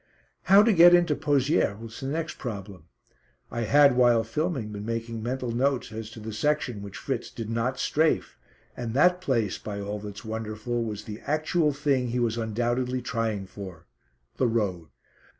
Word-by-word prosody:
How 200 Hz, +2 st, +7 dB
to 225 Hz, 0 st, +4 dB
get 175 Hz, 0 st, +8 dB
into 175 Hz, -4 st, +3 dB
Pozières 145 Hz, -7 st, +1 dB
was 115 Hz, 0 st, -9 dB
the 135 Hz, -, -4 dB
next 160 Hz, +3 st, -3 dB
problem. 100 Hz, -, -7 dB, 0.7 s
I 120 Hz, -, -3 dB
had, 140 Hz, +2 st, +6 dB
while 120 Hz, -2 st, +4 dB
filming, 130 Hz, -1 st, -2 dB
been 105 Hz, -1 st, -6 dB
making 115 Hz, 0 st, -4 dB
mental 125 Hz, +1 st, -3 dB
notes 130 Hz, +2 st, 0 dB
as 110 Hz, 0 st, -6 dB
to 115 Hz, -, -11 dB
the 110 Hz, 0 st, -6 dB
section 125 Hz, -2 st, 0 dB
which 100 Hz, -1 st, -8 dB
Fritz 130 Hz, -4 st, -3 dB
did 115 Hz, -1 st, -6 dB
not 120 Hz, +3 st, -1 dB
"strafe," 155 Hz, +5 st, +1 dB, 0.4 s
and 120 Hz, -1 st, -4 dB
that 180 Hz, +5 st, +4 dB
place, 115 Hz, -, 0 dB
by 100 Hz, -1 st, -5 dB
all 100 Hz, +1 st, -4 dB
that's 105 Hz, +1 st, -8 dB
wonderful, 110 Hz, +2 st, -3 dB
was 105 Hz, -2 st, -5 dB
the 105 Hz, +1 st, -7 dB
actual 155 Hz, +1 st, +1 dB
thing 140 Hz, -3 st, 0 dB
he 120 Hz, +1 st, -1 dB
was 115 Hz, -2 st, +1 dB
undoubtedly 120 Hz, +3 st, -1 dB
trying 115 Hz, -5 st, -2 dB
for 95 Hz, -3 st, -10 dB, 0.5 s
the 130 Hz, -, +2 dB
road. 100 Hz, -8 st, -1 dB
120 Hz, 170 wpm, -27 LUFS, 110-140 Hz, 0.7 s, get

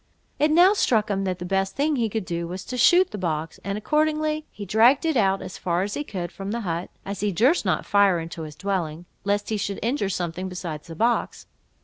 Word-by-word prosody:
It 300 Hz, +2 st, +4 dB
now 350 Hz, +5 st, +6 dB
struck 220 Hz, -, +2 dB
him, 195 Hz, 0 st, -1 dB
that 185 Hz, -1 st, -1 dB
the 180 Hz, -, -6 dB
best 195 Hz, +1 st, 0 dB
thing 295 Hz, +2 st, +1 dB
he 230 Hz, -4 st, 0 dB
could 215 Hz, -2 st, -3 dB
do 170 Hz, -1 st, -3 dB
was 180 Hz, +1 st, -6 dB
to 255 Hz, -, -5 dB
shoot 350 Hz, +9 st, +5 dB
the 210 Hz, -, -5 dB
box; 160 Hz, -3 st, -3 dB
and 200 Hz, +1 st, -3 dB
accordingly 305 Hz, +4 st, 0 dB
he 205 Hz, -, -8 dB
dragged 235 Hz, -, +4 dB
it 320 Hz, -2 st, +1 dB
out, 195 Hz, -4 st, +2 dB
as -, -, -8 dB
far 175 Hz, 0 st, 0 dB
as 205 Hz, +1 st, -3 dB
he 290 Hz, -, -2 dB
could, 180 Hz, -10 st, -5 dB
from 195 Hz, 0 st, -7 dB
the 235 Hz, +3 st, -2 dB
hut, 170 Hz, -3 st, -3 dB, 0.2 s
as 200 Hz, 0 st, -5 dB
he 205 Hz, 0 st, 0 dB
durst 250 Hz, -, +3 dB
not -, -, 0 dB
fire 200 Hz, -3 st, +4 dB
into 165 Hz, 0 st, -6 dB
his 155 Hz, -2 st, -7 dB
dwelling, 175 Hz, -3 st, -3 dB, 0.2 s
lest 205 Hz, 0 st, 0 dB
he 220 Hz, -, 0 dB
should 200 Hz, -1 st, -3 dB
injure 235 Hz, -3 st, 0 dB
something 180 Hz, 0 st, -3 dB
besides 170 Hz, -4 st, -6 dB
the 165 Hz, -, -8 dB
box. 235 Hz, +7 st, 0 dB
200 Hz, 235 wpm, -24 LUFS, 180-240 Hz, 0.2 s, now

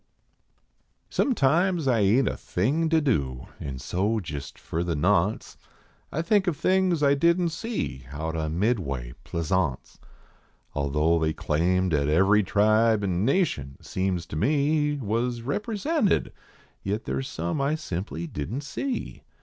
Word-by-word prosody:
Sometimes 175 Hz, -, +2 dB
I 120 Hz, -3 st, +3 dB
ain 110 Hz, +7 st, +4 dB
t -, -, +1 dB
a -, -, -6 dB
thing 145 Hz, -, 0 dB
to 160 Hz, 0 st, +4 dB
do 70 Hz, -, 0 dB
an 70 Hz, -3 st, -5 dB
so, 95 Hz, -, -1 dB
jist 75 Hz, -7 st, -7 dB
for 85 Hz, +1 st, -3 dB
the 85 Hz, -2 st, -1 dB
nonce, 95 Hz, +5 st, +1 dB, 0.5 s
I 160 Hz, -, -1 dB
think 200 Hz, +2 st, +2 dB
of 165 Hz, -5 st, 0 dB
things 185 Hz, -2 st, +2 dB
I 140 Hz, 0 st, +5 dB
didn 170 Hz, +5 st, +3 dB
t -, -, -10 dB
see 160 Hz, -, -4 dB
out 80 Hz, +3 st, -4 dB
on 80 Hz, 0 st, -2 dB
Midway 70 Hz, -, -1 dB
Plaisance. 85 Hz, -4 st, -2 dB, 0.7 s
Although 75 Hz, +4 st, +1 dB
they 80 Hz, -1 st, +1 dB
claimed 90 Hz, +4 st, +1 dB
at 70 Hz, -1 st, +2 dB
every 95 Hz, +7 st, +4 dB
tribe 110 Hz, +2 st, +3 dB
an 95 Hz, 0 st, 0 dB
nation, 110 Hz, -, 0 dB
seems 95 Hz, -2 st, -2 dB
to -, -, -8 dB
me, 145 Hz, -, +1 dB
Was 120 Hz, 0 st, -1 dB
represented, 215 Hz, -, 0 dB, 0.5 s
yit 105 Hz, +3 st, -2 dB
there 65 Hz, 0 st, -2 dB
s 65 Hz, -, -4 dB
some 85 Hz, -, -3 dB
I 140 Hz, +3 st, +1 dB
simply 85 Hz, -, -4 dB
didn 85 Hz, -, -4 dB
t -, -, -11 dB
see. 260 Hz, -, -4 dB
105 Hz, 150 wpm, -26 LUFS, -, 0.7 s, I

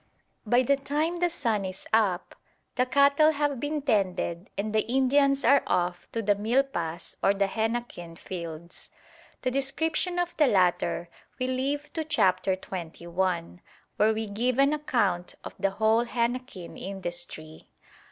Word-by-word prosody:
By 245 Hz, +4 st, +4 dB
the 280 Hz, +3 st, +3 dB
time 300 Hz, +5 st, -1 dB
the 350 Hz, 0 st, +2 dB
sun 230 Hz, -11 st, 0 dB
is 185 Hz, 0 st, -6 dB
up, 200 Hz, -5 st, +2 dB, 0.4 s
the 250 Hz, 0 st, +1 dB
cattle 285 Hz, +4 st, +5 dB
have 290 Hz, -3 st, 0 dB
been 295 Hz, +1 st, -2 dB
tended 185 Hz, -, 0 dB
and 210 Hz, +1 st, -2 dB
the 215 Hz, -, +4 dB
Indians 275 Hz, +1 st, +3 dB
are 280 Hz, 0 st, +6 dB
off 175 Hz, 0 st, -1 dB
to 230 Hz, -, -2 dB
the 205 Hz, 0 st, +4 dB
milpas 205 Hz, -6 st, -1 dB
or 200 Hz, -, +3 dB
the 200 Hz, 0 st, +2 dB
henequen 220 Hz, -5 st, -3 dB
fields. 170 Hz, -2 st, -7 dB, 0.5 s
The 255 Hz, -, +1 dB
description 320 Hz, +6 st, 0 dB
of 350 Hz, 0 st, -1 dB
the 300 Hz, -, +5 dB
latter 180 Hz, -4 st, +2 dB, 0.3 s
we 255 Hz, -, -1 dB
leave 275 Hz, +3 st, -2 dB
to 320 Hz, -, -2 dB
Chapter 190 Hz, -9 st, +2 dB
XXI., 175 Hz, -1 st, -3 dB, 0.4 s
where 215 Hz, +1 st, +4 dB
we 220 Hz, 0 st, -2 dB
give 230 Hz, +5 st, -1 dB
an 275 Hz, +2 st, +4 dB
account 260 Hz, -12 st, 0 dB
of -, -, -7 dB
the 195 Hz, +1 st, +2 dB
whole 220 Hz, +4 st, +2 dB
henequen 235 Hz, -6 st, -3 dB
industry. 175 Hz, -4 st, -6 dB
225 Hz, 145 wpm, -27 LUFS, 185-275 Hz, 0.5 s, are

